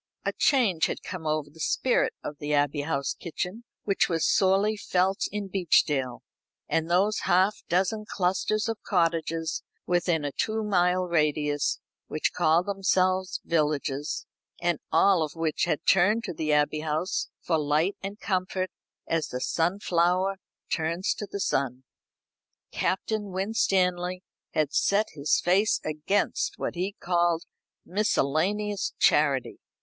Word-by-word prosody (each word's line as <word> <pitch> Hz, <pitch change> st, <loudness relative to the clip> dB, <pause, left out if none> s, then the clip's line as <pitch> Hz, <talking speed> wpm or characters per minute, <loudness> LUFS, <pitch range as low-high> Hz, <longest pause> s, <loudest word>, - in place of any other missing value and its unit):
A -, -, 0 dB
change 220 Hz, -, +3 dB
had -, -, -5 dB
come 175 Hz, -5 st, -6 dB
over 155 Hz, -1 st, -1 dB
the 160 Hz, -, -18 dB
spirit 250 Hz, +9 st, +1 dB
of 145 Hz, -, -6 dB
the 150 Hz, 0 st, -1 dB
Abbey 145 Hz, 0 st, +1 dB
House 140 Hz, -2 st, -1 dB
kitchen, 180 Hz, +7 st, -5 dB, 0.2 s
which 195 Hz, -1 st, +1 dB
was 165 Hz, -2 st, +1 dB
sorely 195 Hz, +3 st, +3 dB
felt 190 Hz, -1 st, 0 dB
in 205 Hz, 0 st, -3 dB
Beechdale 150 Hz, -9 st, +1 dB, 0.4 s
and 165 Hz, 0 st, 0 dB
those 195 Hz, +5 st, +2 dB
half 190 Hz, +4 st, +3 dB
dozen 195 Hz, +4 st, +1 dB
clusters 195 Hz, +4 st, 0 dB
of 225 Hz, -1 st, -3 dB
cottages 165 Hz, -2 st, 0 dB, 0.2 s
within 175 Hz, -3 st, +1 dB
a 145 Hz, -, -2 dB
two 220 Hz, +8 st, -1 dB
mile 180 Hz, -3 st, +2 dB
radius, 150 Hz, -4 st, 0 dB, 0.3 s
which 155 Hz, -, -1 dB
called 170 Hz, 0 st, +3 dB
themselves 185 Hz, -1 st, +1 dB
villages, 150 Hz, -2 st, -1 dB, 0.3 s
and 175 Hz, -3 st, 0 dB
all 180 Hz, +2 st, +4 dB
of 155 Hz, 0 st, -3 dB
which 165 Hz, -1 st, 0 dB
had 155 Hz, +2 st, -2 dB
turned 205 Hz, +5 st, +4 dB
to 200 Hz, -, -4 dB
the 155 Hz, -1 st, -2 dB
Abbey 150 Hz, +1 st, +2 dB
House 155 Hz, +4 st, -2 dB
for 160 Hz, -2 st, 0 dB
light 155 Hz, +6 st, +1 dB
and 200 Hz, +2 st, -6 dB
comfort, 185 Hz, -1 st, -1 dB, 0.3 s
as 165 Hz, -1 st, 0 dB
the 125 Hz, -, -4 dB
sunflower 180 Hz, +4 st, +1 dB, 0.4 s
turns 170 Hz, +3 st, 0 dB
to 205 Hz, -, -6 dB
the 200 Hz, -, -4 dB
sun. 130 Hz, -7 st, -1 dB, 0.9 s
Captain 210 Hz, +2 st, -1 dB
Winstanley 185 Hz, -2 st, 0 dB, 0.3 s
had 150 Hz, -2 st, +1 dB
set 210 Hz, +2 st, +2 dB
his 145 Hz, -1 st, +1 dB
face 190 Hz, +5 st, +2 dB
against 200 Hz, -, -1 dB
what -, -, -3 dB
he 185 Hz, +3 st, -2 dB
called 175 Hz, -1 st, +1 dB, 0.4 s
miscellaneous 200 Hz, +2 st, 0 dB
charity. 140 Hz, -4 st, +2 dB
175 Hz, 135 wpm, -27 LUFS, 155-195 Hz, 0.9 s, all